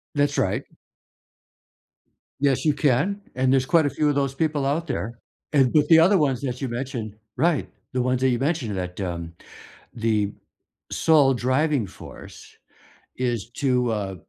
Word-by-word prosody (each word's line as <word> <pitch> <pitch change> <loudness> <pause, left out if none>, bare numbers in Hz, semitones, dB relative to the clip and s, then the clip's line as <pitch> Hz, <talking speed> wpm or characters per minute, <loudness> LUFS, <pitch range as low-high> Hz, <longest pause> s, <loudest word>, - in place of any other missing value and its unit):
That's 145 0 +1
right. - - 0 1.8
Yes, 140 0 +2
you 155 - +4
can. 150 +8 +1
And 130 0 +2
there's 135 -1 +2
quite 165 -1 +4
a - - 0
few 150 +1 0
of 145 - +2
those 135 -1 0
people 150 -2 0
out 155 +4 0
there. 120 -4 -4 0.3
And, 135 -4 +3
but 150 -1 +3
the 165 - +7
other 185 +5 +5
ones 135 -6 +1
that 125 -2 -3
you 135 - -2
mentioned 120 -3 -5 0.2
Right, 165 -3 +1 0.3
the 125 - +1
ones 125 0 0
that 130 - +3
you 125 -2 +1
mentioned 135 - -1
that, 90 +1 -5
um, 85 -3 -4 0.6
the 110 -3 0 0.6
sole 150 -4 +4
driving 130 0 +1
force 95 - -12 0.7
is 120 -4 -2
to, 125 -2 0
uh, 100 -3 -3
130 Hz, 160 wpm, -24 LUFS, 120-145 Hz, 1.8 s, the